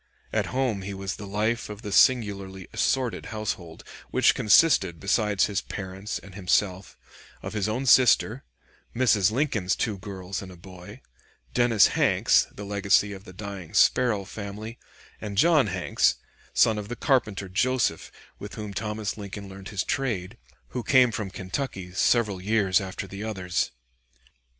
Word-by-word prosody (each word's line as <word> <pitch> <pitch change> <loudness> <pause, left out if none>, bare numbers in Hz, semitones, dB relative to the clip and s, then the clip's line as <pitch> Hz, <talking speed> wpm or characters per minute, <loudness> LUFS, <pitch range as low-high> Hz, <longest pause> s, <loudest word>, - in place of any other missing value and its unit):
At - - 0
home 125 -6 -1
he 100 +1 -6
was 95 0 -4
the 100 - -8
life 105 +4 -1
of 105 0 -9
the 105 - -5
singularly 100 -6 +2
assorted 130 -4 0
household, 100 -7 -5 0.3
which - - +4
consisted, 100 - +4
besides 100 0 +2
his 100 -2 -2
parents 95 +1 -6
and 100 - -13
himself, 95 0 -1 0.5
of - - -6
his 105 -1 -1
own 125 +5 -2
sister, 125 0 +4 0.5
Mrs. 110 -5 +3
Lincoln's 110 -8 0
two 105 -4 -2
girls 95 -1 -6
and 95 -3 -11
boy, 90 0 -12 0.5
Dennis 115 - +4
Hanks, - - +3
the 105 - -9
legacy 100 0 +2
of 95 +1 -11
the 95 - -11
dying 95 -4 -8
Sparrow 120 -6 +3
family, 105 +3 -7 0.4
and 105 -2 -6
John 155 -1 +5
Hanks 95 -2 +1 0.4
(son 110 -2 +3
of 105 - -7
the 120 - -5
carpenter 105 -9 0
Joseph 115 -1 0 0.3
with 100 - -8
whom 105 -2 -6
Thomas 105 +1 -3
Lincoln 100 -1 -7
learned 95 +1 -10
his 105 -3 -2
trade), 115 -7 -2 0.3
who 125 - -4
came 125 +1 +4
from 105 -2 -4
Kentucky 95 -1 -5
several 105 -1 +2
years 100 -2 +2
after 95 -1 -5
the 100 +2 -8
others. 95 -8 -2
100 Hz, 150 wpm, -26 LUFS, 95-110 Hz, 0.5 s, John